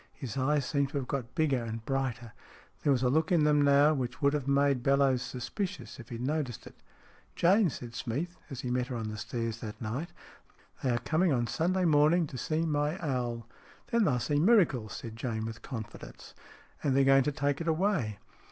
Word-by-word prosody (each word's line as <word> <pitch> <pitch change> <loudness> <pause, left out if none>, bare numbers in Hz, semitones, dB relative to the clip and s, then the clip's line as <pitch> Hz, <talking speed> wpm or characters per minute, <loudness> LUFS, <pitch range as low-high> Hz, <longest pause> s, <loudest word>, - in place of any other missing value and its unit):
His 130 -4 -7
eyes 140 +2 +1
seemed 140 -2 0
to 140 - -3
have 130 -2 -3
got 125 -3 -4
bigger 140 -6 +1
and 115 0 -6
brighter. 130 -4 -2 0.5
There 145 - +2
was 130 -2 +2
a 125 - +3
look 160 +4 +1
in 170 -4 +4
them 150 -1 +4
now 145 +2 +5
which 125 -3 -3
would 140 -1 +3
have 145 -3 -2
made 140 -2 +3
Bellowes 135 -1 +3
suspicious 130 - -5
if 120 - -11
he 120 - -5
had 120 +2 -4
noticed 145 -4 -2
it. - - -11 0.6
"Jane," 190 +2 +4
said 120 -3 -8
Smeath, 145 +10 -3
as 135 -3 -6
he 125 - -3
met 125 0 0
her 125 - -5
on 110 -2 -3
the 110 - -6
stairs 115 0 -3
that 105 -2 -7
night, 125 +10 -4 0.4
" - - -30
they 130 - +1
are 120 - +2
coming 160 +8 +1
on 120 -3 +1
Sunday 180 +10 0
morning 155 +2 +4
to 135 - -8
see 160 +5 -1
my 150 +1 0
owl." 120 -6 -2 0.4
"Then 230 -2 +3
they'll 125 - +2
see 145 +5 0
miracles," 160 - +3
said 115 -1 -7
Jane, 115 -2 -3
with 115 0 -7
confidence. 110 -4 -8 0.2
" - - -26
And 135 -2 +2
they're 140 - +5
going 135 0 +6
to 150 - +1
take 145 +1 -1
it 165 - -4
away." 160 - 0
135 Hz, 215 wpm, -30 LUFS, 120-155 Hz, 0.6 s, going